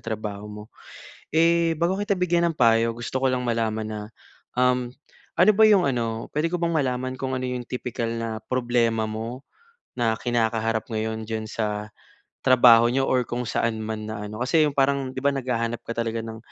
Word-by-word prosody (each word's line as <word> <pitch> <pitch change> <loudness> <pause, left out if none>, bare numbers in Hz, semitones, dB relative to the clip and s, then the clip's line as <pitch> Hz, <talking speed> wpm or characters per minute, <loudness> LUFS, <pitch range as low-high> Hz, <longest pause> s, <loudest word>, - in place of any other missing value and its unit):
trabaho 105 -2 -5
mo. 105 0 -8 0.7
Eh, 165 0 +3
bago 180 +5 0
kita 205 -1 0
bigyan 175 -1 +2
ng 160 - -6
payo, 115 -1 +3
gusto 120 +2 -3
ko 135 - +3
lang 125 -1 -1
malaman 110 -2 -1
na, 110 0 -5 0.6
um, 125 -1 +2 0.5
ano 215 - +6
ba 220 - +4
'yong 195 -4 +5
ano 115 -4 -2
puwede 155 +3 0
ko 180 - -1
bang 170 -1 -1
malaman 130 -4 -1
kung 130 0 -3
ano 130 - -3
'yong 125 -1 -4
tipikal 125 -2 -3
na 115 -1 -4
problema 120 -2 0
mo, 115 +4 -6 0.5
na 115 -2 0
kinakaharap 115 -2 -1
ngayon 110 0 -3
diyan 110 -1 -3
sa 105 -1 -4 0.5
trabaho 120 -3 +6
n'yo 130 +3 +1
or 125 -2 +1
kung 120 +1 -3
saan 115 -1 -1
man 110 0 -5
na 110 -1 -5
ano 105 +2 -7
kasi 155 +5 +3
'yong 150 - 0
parang, 140 -1 +1
'di 130 - -5
ba 140 +1 +1
naghahanap 120 -3 -2
ka - - -4
talaga 115 -1 -2
ng, 110 0 -7
120 Hz, 185 wpm, -24 LUFS, 110-135 Hz, 0.7 s, ano